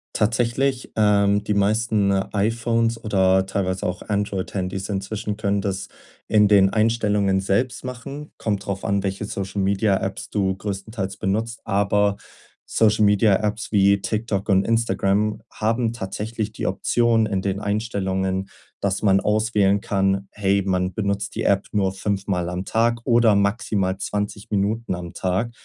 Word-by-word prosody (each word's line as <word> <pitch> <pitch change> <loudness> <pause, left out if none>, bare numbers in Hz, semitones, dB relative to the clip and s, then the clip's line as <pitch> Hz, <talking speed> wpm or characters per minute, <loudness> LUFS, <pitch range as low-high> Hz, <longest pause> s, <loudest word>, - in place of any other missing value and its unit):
Tatsächlich, 120 +4 0
ähm, 105 -1 +3
die 105 - -1
meisten 105 0 +2
iPhones 115 +4 0
oder 95 -2 +3
teilweise 95 -1 -2
auch 90 0 -3
Android-Handys 95 -1 -3
inzwischen 100 +1 -3
können 100 -2 0
das 95 -1 -3 0.4
in 105 -1 +4
den 95 -2 +5
Einstellungen 105 -3 +2
selbst 115 +8 0
machen. 140 +4 -7
Kommt 105 -3 -2
drauf 100 -1 -4
an, 100 0 0
welche 100 +1 -2
Social-Media-Apps 100 0 -1
du 95 -2 0
größtenteils 100 0 -5
benutzt, 110 +4 -2
aber 100 0 +1 0.5
Social-Media-Apps 105 0 +2
wie 100 -1 +4
TikTok 110 -2 -2
und 95 0 +4
Instagram 105 -2 +1
haben 115 +1 0
tatsächlich 110 +1 -4
die - - -5
Option 115 -2 +2
in 95 -3 -1
den 100 0 -1
Einstellungen, 95 -3 -2 0.3
dass 100 +1 -1
man 95 -1 +4
auswählen 105 -1 +2
kann, 95 0 0
hey, 100 -1 +1
man 90 -1 0
benutzt 100 -1 -2
die - - -2
App 100 0 +2
nur 95 -2 +1
fünfmal 95 -3 -2
am 90 +1 -4
Tag 115 +1 +1
oder 115 -4 +4
maximal 100 -2 0
20 105 0 -4
Minuten 105 0 -1
am 85 -1 -7
Tag. 95 +6 -1
100 Hz, 135 wpm, -22 LUFS, 95-110 Hz, 0.5 s, den